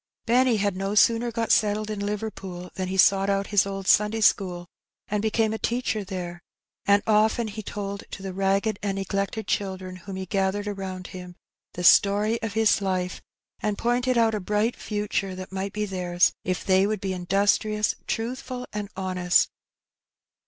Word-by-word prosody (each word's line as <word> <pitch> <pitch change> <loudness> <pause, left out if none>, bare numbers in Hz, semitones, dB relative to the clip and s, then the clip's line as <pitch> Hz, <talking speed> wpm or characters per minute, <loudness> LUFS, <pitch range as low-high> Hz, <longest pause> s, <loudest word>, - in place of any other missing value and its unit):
Benny 245 0 +3
had 200 -2 0
no 195 +2 -2
sooner 230 +2 +4
got 230 -1 -1
settled 215 0 +2
in 210 - -4
Liverpool 195 -4 -5
than 185 -1 -3
he 190 +1 -3
sought 195 +1 +5
out 195 0 +1
his 200 -1 +4
old 195 -1 -5
Sunday 210 +3 +3
school, 180 -4 +2 0.4
and 210 0 0
became 220 0 +1
a 220 - -4
teacher 235 -3 -1
there; 180 -3 -6 0.5
and 200 0 +5
often 220 +2 +3
he 215 +1 -6
told 200 -1 -5
to 195 - -8
the 190 -1 -5
ragged 195 +3 0
and 200 -1 -1
neglected 195 +2 -2
children 190 -2 -3
whom 195 +1 -8
he 190 0 -4
gathered 195 +2 -1
around 190 -2 -5
him 180 -1 -9 0.4
the 180 - -5
story 205 +5 +5
of 225 -2 -3
his 220 -1 +3
life, 185 -1 -2 0.4
and 210 -1 -1
pointed 245 +1 +1
out 225 -1 +3
a 215 - -1
bright 210 +4 0
future 205 -2 -2
that 185 0 -8
might 190 +1 -3
be 210 +1 -2
theirs 180 -2 +1
if 185 -2 -2
they 190 +1 +4
would 215 -1 -1
be 190 -1 -2
industrious, 205 +3 +1
truthful, 250 +2 -3
and 205 -1 -4
honest. 185 -2 +2
200 Hz, 175 wpm, -25 LUFS, 190-215 Hz, 0.5 s, sought